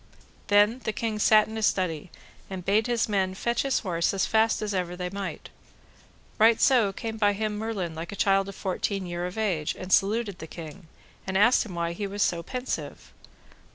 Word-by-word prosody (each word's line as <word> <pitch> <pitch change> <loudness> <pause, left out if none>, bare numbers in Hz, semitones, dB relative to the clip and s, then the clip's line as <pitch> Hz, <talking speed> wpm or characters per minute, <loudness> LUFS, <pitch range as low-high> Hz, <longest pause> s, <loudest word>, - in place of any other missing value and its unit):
Then 205 +4 +4
the 220 - -2
king 220 -2 -2
sat 215 0 +5
in 220 - -8
a - - -4
study, 185 -5 0 0.4
and 185 -2 -6
bade 210 +3 +2
his 240 -2 +1
men 190 -3 0
fetch 235 +4 0
his 275 -2 0
horse 175 -2 0
as 195 - +1
fast 220 0 +2
as 210 -1 -2
ever 180 -2 -2
they 180 0 -4
might. 200 -1 -6 0.9
Right 225 +1 +5
so 240 -7 +4
came 220 +3 -5
by 205 -1 +3
him 215 +1 -2
Merlin 205 -7 -3
like 165 +3 -6
a - - -6
child 195 0 +2
of 195 - -9
fourteen 195 +1 -2
year 175 0 -3
of 180 - -9
age, 180 -9 -1
and 185 +1 -3
saluted 205 -1 +2
the 160 - -7
king, 165 +2 -10 0.4
and 190 0 0
asked 235 +3 +4
him 185 - -8
why 170 0 -1
he 200 +3 -4
was 200 +1 -1
so 170 -1 0
pensive. 250 +8 -5
200 Hz, 200 wpm, -26 LUFS, 180-220 Hz, 0.9 s, sat